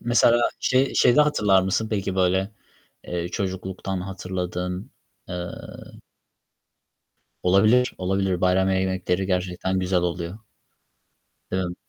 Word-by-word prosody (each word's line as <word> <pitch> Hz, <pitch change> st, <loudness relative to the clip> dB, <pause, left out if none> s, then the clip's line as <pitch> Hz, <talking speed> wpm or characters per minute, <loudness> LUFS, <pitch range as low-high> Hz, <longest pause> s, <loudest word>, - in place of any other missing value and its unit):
mesela, 120 Hz, 0 st, +4 dB, 0.2 s
şey 130 Hz, +1 st, +2 dB
şeyde 125 Hz, +5 st, +5 dB
hatırlar 105 Hz, -10 st, +3 dB
mısın, 105 Hz, +4 st, 0 dB
peki, 100 Hz, -3 st, -1 dB
böyle, 95 Hz, +2 st, +2 dB, 0.6 s
eee, 85 Hz, 0 st, -3 dB
çocukluktan 95 Hz, 0 st, -4 dB
hatırladığın, 90 Hz, 0 st, -4 dB, 0.4 s
eee 90 Hz, -, -5 dB, 2.1 s
Olabilir, 110 Hz, +7 st, +4 dB
olabilir. 95 Hz, -1 st, 0 dB
Bayram 95 Hz, +1 st, +3 dB
ye 95 Hz, 0 st, +2 dB
yemekleri 95 Hz, 0 st, -1 dB
gerçekten 90 Hz, 0 st, -1 dB
güzel 90 Hz, 0 st, +1 dB
oluyor. 90 Hz, +2 st, -3 dB, 1.1 s
Değil 95 Hz, -, +1 dB
mi? 90 Hz, -, -6 dB
95 Hz, 105 wpm, -24 LUFS, 90-100 Hz, 2.1 s, şeyde